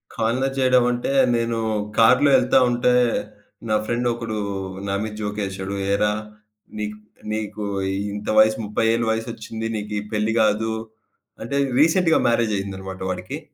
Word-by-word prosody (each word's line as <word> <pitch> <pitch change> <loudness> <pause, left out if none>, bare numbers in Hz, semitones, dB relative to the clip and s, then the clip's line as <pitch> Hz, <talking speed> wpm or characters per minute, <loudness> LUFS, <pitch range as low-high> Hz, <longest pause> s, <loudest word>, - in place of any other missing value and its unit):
Corner 125 +4 0
చేయడం 130 -1 +4
అంటే, 120 +2 -2 0.2
నేను 115 0 0 0.4
కార్‌లో 125 +5 +5
ఎళ్తా 130 +1 +3
ఉంటే, 120 +1 +2 0.8
నా 110 - +3
ఫ్రెండ్ 120 +2 -1
ఒకడు 115 -2 -4 0.5
నా 100 - -1
మీద 110 -1 -5
జోక్ 105 0 -3
ఏసాడు, 95 +1 -5 0.2
"ఏరా! 105 +1 +2 0.7
నీకు 105 0 -4 0.3
నీకు 110 -1 -4 0.5
ఇంత 105 0 -6
వయసు 110 0 +5
30 105 +2 -1
ఏళ్ల 115 0 +1
వయసొచ్చింది 110 0 -4
నీకు 105 0 -5
ఈ - - -4
పెళ్లి 110 +1 0
కాదు" 110 +1 +1 0.7
అంటే 140 +5 -2 0.2
రీసెంట్‌గా 165 +1 +4
మ్యారేజ్ 115 -3 +1
అయిందన్నమాట 95 -1 -7
వాడికి. 90 0 -5
110 Hz, 135 wpm, -22 LUFS, 105-120 Hz, 0.8 s, కార్‌లో